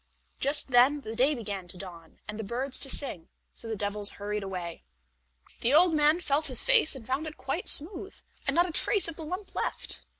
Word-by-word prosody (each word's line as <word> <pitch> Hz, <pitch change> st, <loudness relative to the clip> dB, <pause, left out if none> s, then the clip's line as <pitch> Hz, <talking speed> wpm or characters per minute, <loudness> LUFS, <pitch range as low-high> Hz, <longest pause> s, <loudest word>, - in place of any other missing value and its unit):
Just 285 Hz, +1 st, 0 dB
then 260 Hz, +4 st, +4 dB
the 220 Hz, -3 st, -7 dB
day 270 Hz, +5 st, +2 dB
began 200 Hz, -6 st, -6 dB
to 180 Hz, -, -9 dB
dawn, 170 Hz, -4 st, -11 dB
and 210 Hz, +1 st, -7 dB
the -, -, -4 dB
birds 250 Hz, +6 st, -3 dB
to 275 Hz, -, +2 dB
sing, 250 Hz, -, -2 dB, 0.2 s
so 230 Hz, -, -5 dB
the 225 Hz, -, -3 dB
devils 205 Hz, 0 st, +1 dB
hurried 210 Hz, +1 st, -4 dB
away. 180 Hz, -4 st, -7 dB, 0.8 s
The 250 Hz, +5 st, +2 dB
old 345 Hz, +1 st, +5 dB
man 305 Hz, +2 st, +3 dB
felt 300 Hz, -2 st, +1 dB
his 255 Hz, -3 st, +2 dB
face 470 Hz, -, +4 dB
and 250 Hz, -4 st, -11 dB
found 270 Hz, +6 st, -3 dB
it 310 Hz, -, -9 dB
quite -, -, -4 dB
smooth, 365 Hz, +5 st, +3 dB, 0.3 s
and -, -, 0 dB
not 345 Hz, +1 st, +3 dB
a -, -, -6 dB
trace 390 Hz, +4 st, +3 dB
of 330 Hz, -, -6 dB
the 320 Hz, -, -9 dB
lump 370 Hz, +5 st, -7 dB
left. -, -, -4 dB
265 Hz, 210 wpm, -28 LUFS, 210-310 Hz, 0.8 s, old